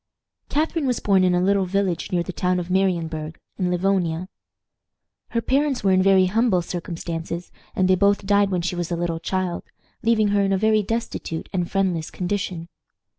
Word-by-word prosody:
Catharine 310 0 0
was 250 -2 0
born 195 -2 +3
in 180 -1 +3
a - - +2
little 195 +1 +2
village 190 -2 -1
near 175 -2 +1
the 185 - -6
town 180 0 0
of 175 0 -5
Marienburg, 165 -4 0 0.2
in 180 -1 +1
Livonia. 180 -1 0 1.0
Her 230 - -1
parents 275 -2 +1
were 195 - +3
in 185 0 +4
very 190 -1 +5
humble 200 -2 +2
circumstances, 170 -1 -5 0.2
and 185 - +2
they 185 - +5
both 200 +2 +2
died 200 0 +3
when 180 -3 -1
she 180 +1 -2
was 175 -2 -3
a 175 - -1
little 170 -1 -2
child, 185 0 -2 0.4
leaving 220 -2 +3
her 200 0 +2
in 195 0 +1
a - - +2
very 215 +1 +3
destitute 215 -6 -4
and 180 -2 -1
friendless 185 -5 0
condition. 180 -2 -3
185 Hz, 180 wpm, -23 LUFS, 175-200 Hz, 1.0 s, very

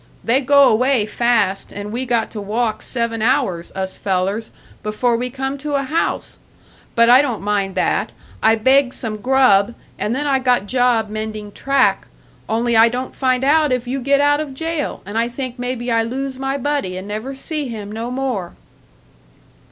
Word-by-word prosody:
They 250 +4 +2
go 280 +1 +5
away 250 0 +3
fast, 220 -3 0
and 205 +1 -6
we 250 +3 -3
got 230 -2 0
to 215 - -6
walk 215 +1 -1
seven 235 -2 -2
hours, 225 -9 0
us 190 0 -3
fellers, 195 +3 -1 0.3
before 230 +3 0
we 250 +2 -2
come 270 +2 -4
to 295 +1 -3
a 275 - +1
house! 310 +5 -2 0.6
But 235 0 +5
I 250 +3 +8
don't 245 -8 -3
mind 200 -2 -1
that, 185 - 0 0.3
I 220 0 +5
begged 260 +3 +3
some 220 -3 -4
grub, 235 -3 +3 0.2
and 220 +4 -1
then 290 +2 -2
I 275 -2 +2
got 250 -5 +2
job 245 -1 +1
mending 215 -1 -5
track; 275 +4 +1 0.4
only 235 +1 +1
I 225 +1 +7
don't 250 +2 -5
find 255 -1 +1
out 300 +1 +3
if 250 -1 -1
you 265 +2 -2
get 280 +2 +2
out 290 0 +3
of 290 -3 -5
jail, 325 0 -3
and 205 +3 -2
I 230 - +1
think 250 0 -6
maybe 245 -1 -3
I 230 0 +3
lose 260 +3 -4
my 270 +1 -1
buddy 280 -10 -2
and 185 +2 -7
never 215 +6 -5
see 300 +1 -4
him 210 -4 -6
no 225 +2 -4
more." 250 -9 -3
245 Hz, 185 wpm, -19 LUFS, 215-270 Hz, 0.6 s, I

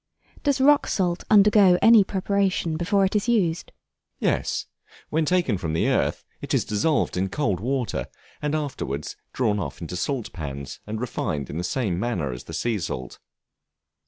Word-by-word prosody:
Does 285 -2 +1
Rock 285 +2 +5
Salt 180 -2 0
undergo 205 -3 +6
any 225 -2 +7
preparation 190 -4 0
before 195 +4 +2
it 190 - -2
is 210 +3 +1
used? 180 -8 +1 0.5
Yes; - - 0 0.5
when 155 +1 +1
taken 160 - +1
from 80 -3 -3
the 80 - +1
earth - - 0 0.2
it - - -1
is - - +1
dissolved 125 +9 +1
in 95 +1 0
cold 105 -8 -1
water, 125 +1 -2 0.3
and 150 +1 -1
afterwards 130 - -4 0.2
drawn 110 -5 0
off 70 -8 -5
into 85 +1 -6
salt 125 +6 -3
pans, 70 -4 -6
and 110 +1 -4
refined 75 - -3
in 80 - -4
the - - -2
same 95 -3 -1
manner 95 - -1
as - - -8
the - - -9
sea 115 -3 -1
salt. 65 -7 -5
135 Hz, 165 wpm, -24 LUFS, -, 0.5 s, any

